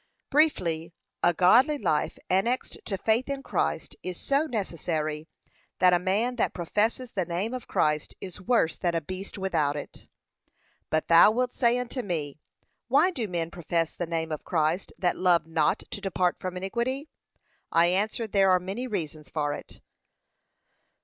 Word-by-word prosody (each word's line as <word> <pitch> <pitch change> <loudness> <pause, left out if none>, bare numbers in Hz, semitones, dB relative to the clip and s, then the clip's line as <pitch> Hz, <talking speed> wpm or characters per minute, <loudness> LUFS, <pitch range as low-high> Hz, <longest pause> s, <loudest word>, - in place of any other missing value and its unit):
Briefly, 170 - +1 0.3
a 175 - +5
godly 245 - +5
life 155 - 0
annexed 230 +8 0
to 195 - -2
faith 225 +7 +1
in 275 -1 -3
Christ - - -2
is 180 -1 -6
so 280 +3 +1
necessary, 160 - -3 0.5
that 180 -1 +5
a 175 - +4
man 210 +7 0
that - - 0
professes 220 +8 0
the 190 - -1
name 180 +7 -2
of 255 -2 -6
Christ 150 -1 0
is 185 -2 -9
worse 205 -6 +1
than 175 -2 0
a 165 - +1
beast 185 +6 -7
without 160 -7 0
it. 145 - -8 0.8
But 155 0 0
thou 165 +4 +8
wilt 250 +3 0
say 240 -1 +3
unto 250 +1 -3
me, 155 - -3 0.5
Why 280 +9 +4
do 240 -10 -3
men 170 -3 -3
profess 165 -1 -1
the 175 - -4
name 160 -1 -2
of 155 - -4
Christ 165 +2 0
that 175 -3 0
love 180 -3 +3
not 160 -2 +1
to - - -5
depart 180 -2 0
from 185 0 -4
iniquity? 235 +10 -2 0.6
I 165 +1 +5
answer, 205 +6 +1
there 195 -2 +3
are 185 -1 +5
many 195 +8 -4
reasons 155 - -4
for 145 -2 -1
it. - - -10
185 Hz, 165 wpm, -27 LUFS, 165-235 Hz, 0.8 s, thou